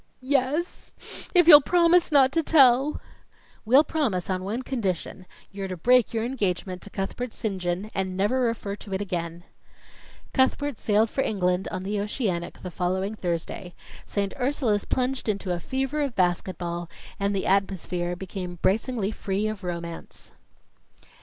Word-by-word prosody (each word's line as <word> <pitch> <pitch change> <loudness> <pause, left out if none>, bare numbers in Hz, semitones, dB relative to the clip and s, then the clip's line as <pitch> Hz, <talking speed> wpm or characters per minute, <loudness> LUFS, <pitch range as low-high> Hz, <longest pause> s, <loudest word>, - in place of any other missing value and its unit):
"Yes 285 +5 -2
if 350 -2 +6
you'll 295 -3 +11
promise 345 +2 +3
not 270 -3 +5
to 330 - +2
tell." 275 -2 +4 0.7
"We'll 260 +7 +6
promise 220 - -1
on 185 0 -2
one 220 +7 -3
condition 195 -7 -3 0.2
you're 195 -1 -5
to 185 -1 -5
break 250 +6 +4
your 225 0 -1
engagement 190 -7 -2
to - - -9
Cuthbert 215 +5 -4
St. 195 -4 -3
John, 180 +4 -2
and 190 -1 -2
never 210 +7 +1
refer 230 -4 -1
to 195 -2 -6
it - - -2
again." 170 -3 -4 0.9
Cuthbert 275 0 +1
sailed 215 +1 +2
for 270 - 0
England 180 -5 0
on 185 - -4
the 205 +2 -2
Oceanic 200 -5 -3
the 180 - -5
following 185 +3 -1
Thursday; 175 -1 -4 0.3
St. 200 -1 -2
Ursula's 250 -6 0
plunged 255 -2 -1
into 200 -3 -1
a 175 - -2
fever 270 - -2
of 275 -4 -2
basket 180 -1 0
ball, 170 -1 -4 0.3
and 200 0 0
the 195 - -1
atmosphere 185 -2 0
became 180 -1 -6
bracingly 215 +2 +1
free 200 -1 -2
of 215 -2 -5
Romance. 170 -1 -6
200 Hz, 155 wpm, -26 LUFS, 185-255 Hz, 0.9 s, you'll